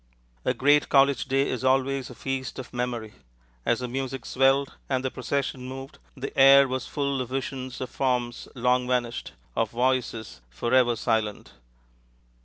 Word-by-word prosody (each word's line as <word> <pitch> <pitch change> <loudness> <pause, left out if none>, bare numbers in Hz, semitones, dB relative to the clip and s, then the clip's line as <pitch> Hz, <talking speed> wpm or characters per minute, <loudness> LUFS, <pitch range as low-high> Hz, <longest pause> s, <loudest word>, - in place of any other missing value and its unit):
A - - +1
great 145 +2 +4
college 140 0 +4
day 135 +1 +1
is 130 -1 -3
always 135 0 +1
a 125 - -10
feast 135 0 -4
of 130 - -8
memory. 120 -3 -3 0.5
As 120 - +2
the 125 - -2
music 130 0 -4
swelled 135 +1 +2
and 130 -1 0
the 130 - -1
procession 130 -1 -3
moved, 135 +2 -8 0.2
the 130 - -6
air 135 0 +8
was 130 -1 -3
full 140 -2 -1
of 125 - -5
visions 130 -1 -4
of 130 - -5
forms 125 -3 -1
long 125 0 +2
vanished, 120 -2 -1 0.2
of 115 -2 +1
voices 120 - -1
forever 120 - +2
silent. 110 -2 -1
130 Hz, 155 wpm, -26 LUFS, 120-135 Hz, 0.5 s, air